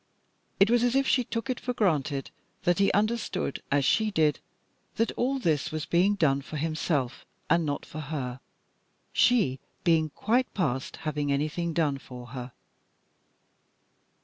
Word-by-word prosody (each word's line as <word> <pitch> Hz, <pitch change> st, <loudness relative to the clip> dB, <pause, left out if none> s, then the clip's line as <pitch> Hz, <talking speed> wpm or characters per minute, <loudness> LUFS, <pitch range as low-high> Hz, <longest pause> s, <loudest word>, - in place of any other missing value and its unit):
It 200 Hz, +3 st, +5 dB
was 240 Hz, -1 st, +4 dB
as 245 Hz, +1 st, +2 dB
if 270 Hz, 0 st, +3 dB
she 250 Hz, -, +3 dB
took 230 Hz, +1 st, -4 dB
it 255 Hz, -2 st, -2 dB
for 250 Hz, -1 st, -3 dB
granted 145 Hz, -9 st, 0 dB, 0.3 s
that 175 Hz, +1 st, +2 dB
he 195 Hz, -, +4 dB
understood, 210 Hz, -, -1 dB
as 140 Hz, -1 st, +3 dB
she 220 Hz, +6 st, +3 dB
did, 155 Hz, -7 st, +2 dB, 0.6 s
that 230 Hz, -, +1 dB
all 265 Hz, +3 st, 0 dB
this 160 Hz, -, 0 dB
was 155 Hz, -1 st, -3 dB
being 185 Hz, +4 st, +3 dB
done 140 Hz, -7 st, +2 dB
for 150 Hz, +2 st, -7 dB
himself, 155 Hz, -4 st, -1 dB, 0.3 s
and 165 Hz, -2 st, +3 dB
not 145 Hz, 0 st, -2 dB
for 155 Hz, -, -8 dB
her, 135 Hz, -5 st, -4 dB, 0.7 s
she 200 Hz, -, +3 dB, 0.2 s
being 160 Hz, -3 st, +3 dB
quite 240 Hz, -, 0 dB
past 155 Hz, -2 st, -1 dB
having 150 Hz, -2 st, -1 dB
anything 155 Hz, +4 st, -1 dB
done 150 Hz, -4 st, +1 dB
for 125 Hz, -2 st, -10 dB
her. 125 Hz, 0 st, -7 dB
160 Hz, 150 wpm, -28 LUFS, 140-215 Hz, 0.7 s, It